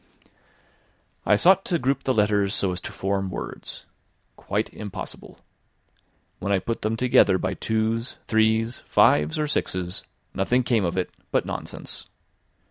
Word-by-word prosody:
I 105 - +6
sought 190 - +5
to 175 - +1
group 135 -1 0
the 130 - +2
letters 105 -1 +2
so 95 - +1
as 90 - -4
to - - -6
form 95 0 -1
words. 90 - -7 0.5
Quite - - -2
impossible! 105 -3 -7 1.0
When 100 - -2
I 100 - +4
put 105 +5 -3
them 110 +1 -1
together 115 -6 +4
by - - -2
twos, 110 +2 -1
threes, 110 +1 +2
fives 75 +1 +4
or 155 - +1
sixes, 90 -11 -2 0.3
nothing 125 +6 +1
came 115 -5 +2
of 85 - -2
it 90 - -1 0.2
but - - +1
nonsense. - - -6
110 Hz, 140 wpm, -25 LUFS, 95-120 Hz, 1.0 s, I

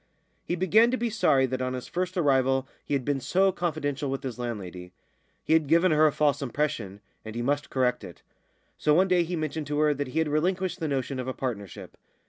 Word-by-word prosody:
He 175 - -2
began 205 +6 +4
to 255 - 0
be 235 -1 -1
sorry 140 - +3
that 130 0 -3
on 130 0 -1
his 125 - -6
first 185 +1 -3
arrival 135 -4 +2 0.2
he 145 - -1
had 130 -3 -2
been 145 -1 0
so 190 +9 +2
confidential 145 -5 -2
with 135 0 -3
his 125 -2 -5
landlady; 90 -7 -6 0.5
he - - +1
had 160 -2 +3
given 170 +4 +4
her 155 0 +5
a - - +2
false 145 -1 +1
impression, 120 -7 -3 0.2
and 110 0 -8
he 120 - -2
must 145 +3 -1
correct 125 -2 0
it. - - -11 0.6
So 150 -1 +3
one 185 +3 +4
day 180 -1 +3
he 175 +1 -2
mentioned 155 -2 -3
to 145 0 -2
her 150 0 +3
that 145 -1 -3
he 130 - -6
had 160 -1 +2
relinquished 180 +4 0
the 160 - -2
notion 135 -1 -2
of 130 - -4
a 130 - -3
partnership. 105 -7 -6
145 Hz, 225 wpm, -27 LUFS, 130-170 Hz, 0.6 s, her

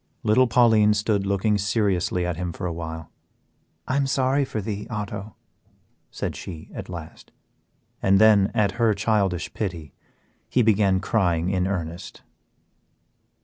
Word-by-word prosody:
Little 125 +4 +4
Pauline 110 -3 +4
stood 100 -1 0
looking 100 +1 +1
seriously 95 -4 0
at 90 -1 -2
him 90 0 -4
for 90 - -6
a 85 - -2
while. 80 -1 -7 0.8
"I 130 - 0
am 140 -1 +1
sorry 135 +1 +1
for 110 - -4
thee, 105 0 -5
Otto," 105 -2 -5 0.7
said - - -4
she, 80 -4 -9
at - - -7
last. 85 -3 -9 0.7
And 95 0 +4
then, 105 -1 +5
at 100 -2 +1
her 110 -3 +3
childish 100 -4 0
pity, 85 -7 -5 0.6
he 125 - +2
began 100 -3 +3
crying 90 -7 +1
in 90 -1 0
earnest. 85 -3 -5
100 Hz, 140 wpm, -24 LUFS, 90-110 Hz, 0.8 s, then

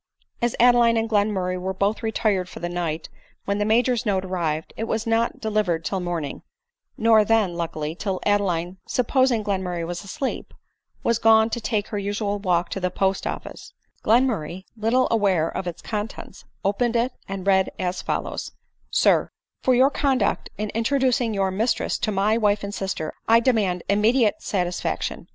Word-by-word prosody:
As 240 -1 +1
Adeline 240 -1 +5
and 225 0 +1
Glenmurray 200 -4 0
were 190 +1 -3
both 200 +4 0
retired 215 -5 0
for - - -9
the 175 - -3
night 170 -2 -3 0.4
when 200 +1 -1
the 205 - +1
major's 240 +2 +2
note 195 -4 0
arrived, 165 -4 -2
it 225 - -3
was 225 0 -2
not 230 +1 +1
delivered 205 -7 0
till 190 - -1
morning 170 -5 -4 0.3
— - - -67
nor 220 -1 +5
then, 215 -4 +2
luckily, 160 -2 -3
till 190 +1 -3
Adeline, 185 -3 0
supposing 250 -2 +2
Glenmurray 185 -4 -2
asleep, 200 - -5 0.5
was 230 -1 +1
gone 220 0 +5
to 235 - -2
take 215 -2 -1
her 205 - -2
usual 205 0 -2
walk 180 -3 +1
to - - -3
the 180 -1 0
post 190 +1 0
office; - - -7 0.3
Glenmurray* 210 -7 +1
little 230 +4 +2
aware 195 -7 +2
of 185 - -3
its 175 -1 -6
contents, 210 0 -6 0.2
opened 230 +4 +1
it, 240 +2 +1 0.2
and 195 -1 -5
read 190 -1 +3
as 180 0 -2
follows; - - -3 0.2
" - - -43
SIB, - - +3 0.2
" - - -61
For 255 - +4
your 265 +3 +5
conduct 265 -8 0
in 210 0 -3
introducing 250 0 +1
your 195 -2 0
mistress 220 +6 0
to 215 - 0
my 210 +3 +2
wife 205 -2 +2
and 200 0 -4
sister, 190 -6 -3
I 230 +1 +6
demand 210 -8 +1
immediate 215 +3 +3
satisfaction. 180 -3 -2
205 Hz, 170 wpm, -23 LUFS, 185-230 Hz, 0.5 s, I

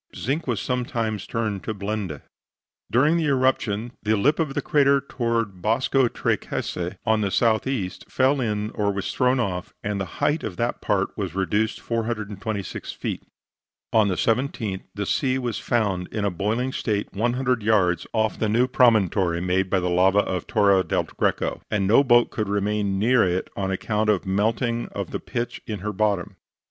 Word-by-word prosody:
Zinc 140 +7 -2
was 120 -6 0
sometimes 115 -4 -2
turned 110 -4 -2
to 110 - -3
blende. 100 -6 -4 0.7
During 145 +8 +4
the 165 - 0
eruption, 130 -5 +1
the 110 0 +1
lip 145 +10 +2
of 150 -4 -1
the - - 0
crater 140 -1 +4
toward 115 -7 -2
Bosco 125 +5 +2
Tre - - 0
Case - - -4 0.3
on 110 0 +2
the 100 - +1
south 110 +4 +2
east, 105 -9 -3
fell 135 +1 +2
in, 105 -2 -1
or 105 -2 0
was 100 -2 -3
thrown 125 0 +2
off, 95 -6 -2
and 100 -1 -2
the 95 - -6
height 150 +2 +1
of 90 -4 -5
that 120 +1 -1
part 100 -2 0
was 95 -5 -4
reduced 105 +4 0
426 110 -3 -3
feet. - - -4 0.7
On 110 -2 +5
the 95 - 0
17th, 115 -5 -1
the 100 -1 -2
sea 130 +5 +1
was 120 -4 -2
found 100 -6 0
in 105 -2 -3
a 100 - +1
boiling 110 +8 -1
state 105 -3 -2
100 120 +3 0
yards 100 -5 +2
off 110 -1 0
the 110 - +1
new 120 +4 +3
promontory 100 -9 +3
made 90 +1 0
by 95 - +2
the 90 - -1
lava 95 +3 +4
of 90 -3 -3
Torre 100 -2 +4
del - - 0
Greco, - - -1
and 105 -2 0
no 115 +8 +5
boat 120 -3 +4
could 105 -3 -2
remain 100 -1 0
near 115 +4 +4
it 90 0 -1
on 95 -1 -2
account 105 +3 0
of 105 -4 +2
the - - -6
melting 115 +4 0
of - - -4
the - - -3
pitch 120 0 -4
in 105 -4 -4
her 105 +1 -3
bottom. 100 -2 0
110 Hz, 180 wpm, -24 LUFS, 100-120 Hz, 0.7 s, On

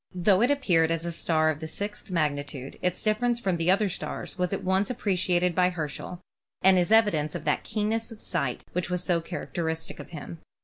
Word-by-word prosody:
Though 185 +2 +4
it 245 - +4
appeared 175 - +3
as 165 0 -1
a 170 - -2
star 155 -1 +2
of 150 - -6
the 160 - -5
sixth 205 +6 -5
magnitude, 145 -5 -2
its 180 -1 0
difference 235 +3 +1
from 190 -6 0
the 165 +1 0
other 200 +3 +4
stars 185 - -5
was 180 -1 -1
at 195 - -2
once 190 +2 +1
appre 235 -5 -1
i - - +3
ciated 180 0 +2
by 180 +1 +3
Herschel 175 +1 -5 0.4
and 190 0 +6
is 175 +3 0
evidence 190 -10 +3
of - - -4
that 150 - +1
keenness 220 +1 -1
of 225 - -11
sight 125 - -2
which 180 0 -1
was 180 0 -1
so 170 -2 +1
characteristic 165 -2 -4
of - - -9
him. 165 0 -8
180 Hz, 215 wpm, -27 LUFS, 160-205 Hz, 0.4 s, and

